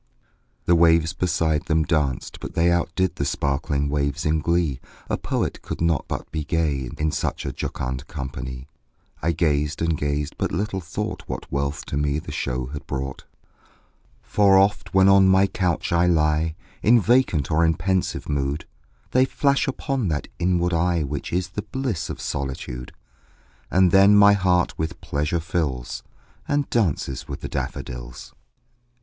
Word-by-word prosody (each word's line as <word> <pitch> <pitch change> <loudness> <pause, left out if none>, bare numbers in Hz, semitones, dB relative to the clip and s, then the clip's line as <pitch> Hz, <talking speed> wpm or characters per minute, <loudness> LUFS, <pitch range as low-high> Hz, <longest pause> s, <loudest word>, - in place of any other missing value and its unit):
The 85 - +4
waves 80 0 +4
beside 85 -4 0
them 80 0 +2
danced; 75 -7 -1
but - - -8
they 85 +1 +3
Outdid 85 +2 0
the - - -1
sparkling 70 0 -1
waves 70 -1 -1
in 80 +1 +2
glee; 80 -4 0 0.3
A - - +3
poet - - -2
could - - -6
not 85 -2 +1
but - - -5
be 80 0 -2
gay, 75 -5 -1
In 75 0 0
such - - -2
a - - -2
jocund 65 +2 -4
company; 65 -2 -6 0.5
I 85 - +1
gazed 75 -2 0
and 80 -1 +1
gazed 75 0 -2
but - - 0
little 95 +3 -2
thought 80 - -4
What - - -6
wealth 70 +1 -2
to 70 - -3
me 75 0 +1
the 80 - -6
show 65 0 -2
had 75 - -7
brought: 65 0 -4 1.0
For 100 -2 +4
oft, 100 +2 +2
when 95 0 +6
on 95 -1 +6
my 95 +1 +5
couch 90 -4 -1
I 85 +1 +3
lie 80 -1 +2 0.3
In 120 +2 +6
vacant 105 - +2
or 80 +2 +3
in 80 -1 +3
pensive 95 -1 -1
mood, 70 +1 -1 0.5
They 130 +1 +4
flash 140 +1 +1
upon 135 -3 -1
that 75 -3 -2
inward 90 0 +1
eye 85 -1 +2
Which 70 0 -4
is 90 0 -1
the 95 +4 -4
bliss 130 - -3
of - - -5
solitude; 65 -2 -4 0.8
And 95 -1 +4
then 100 +2 +7
my 100 0 +8
heart 90 -3 +1
with 80 +2 -3
pleasure 75 +4 -1
fills, 80 -7 -2 0.5
And 145 -1 +1
dances 75 - 0
with 70 -2 -6
the - - -4
daffodils. - - -6
80 Hz, 160 wpm, -23 LUFS, 70-90 Hz, 1.0 s, my